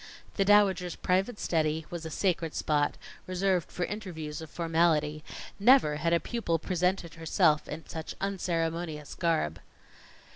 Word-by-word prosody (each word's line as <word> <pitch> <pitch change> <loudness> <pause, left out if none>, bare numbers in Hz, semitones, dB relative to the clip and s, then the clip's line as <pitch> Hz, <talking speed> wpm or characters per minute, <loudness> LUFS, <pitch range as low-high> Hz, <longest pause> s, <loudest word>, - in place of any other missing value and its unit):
The 195 - +2
Dowager's 190 -4 +4
private 195 +5 0
study 160 -1 0
was 170 -2 -5
a - - -6
sacred 165 -2 -1
spot, 145 -1 +1 0.3
reserved 185 -1 0
for 175 - -2
interviews 165 -8 -6
of 160 - -8
formality; 160 -2 +1 0.4
never 210 - +5
had 165 +2 0
a 170 - +4
pupil 170 -3 -1
presented 180 +1 -1
herself 160 -1 +2
in 160 +2 -7
such 160 -1 -6
unceremonious 165 -5 -2
garb. 160 - 0
170 Hz, 135 wpm, -29 LUFS, 155-185 Hz, 0.4 s, never